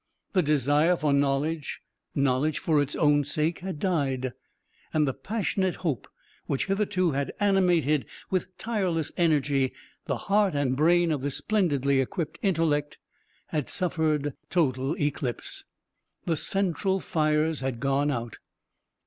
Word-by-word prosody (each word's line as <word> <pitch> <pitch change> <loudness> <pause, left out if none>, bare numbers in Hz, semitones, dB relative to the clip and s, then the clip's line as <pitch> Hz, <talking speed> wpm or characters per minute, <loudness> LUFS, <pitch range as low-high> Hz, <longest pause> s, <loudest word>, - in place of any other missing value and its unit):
The 185 - +4
desire 150 +3 +3
for 150 -3 +1
knowledge 140 +2 0 0.4
knowledge 140 +2 +1
for 155 -3 +2
its 145 0 -2
own 145 -2 +4
sake 155 +4 -1
had 185 -3 -5
died, 135 -8 0 0.6
and 150 -2 +2
the 135 - 0
passionate 195 - -1
hope 140 -9 -1 0.4
which 135 - 0
hitherto 195 -3 +1
had 140 0 -2
animated 180 -7 +3 0.2
with 185 0 -2
tireless 185 -9 -1
energy 145 -5 +2 0.3
the - - 0
heart 200 -4 +3
and 135 -3 +1
brain 170 +3 +4
of 145 -4 -1
this 140 0 -1
splendidly 140 -10 +2
equipped 155 +3 -4
intellect 155 -6 +1 0.5
had 150 -4 -2
suffered 155 -5 0 0.2
total 135 -3 +1
eclipse. 145 -4 -3 0.6
The 165 - +1
central 190 +2 0
fires 155 -2 +1
had 130 -3 -3
gone 140 +2 +1
out. 120 -4 -4
150 Hz, 130 wpm, -27 LUFS, 140-175 Hz, 0.6 s, The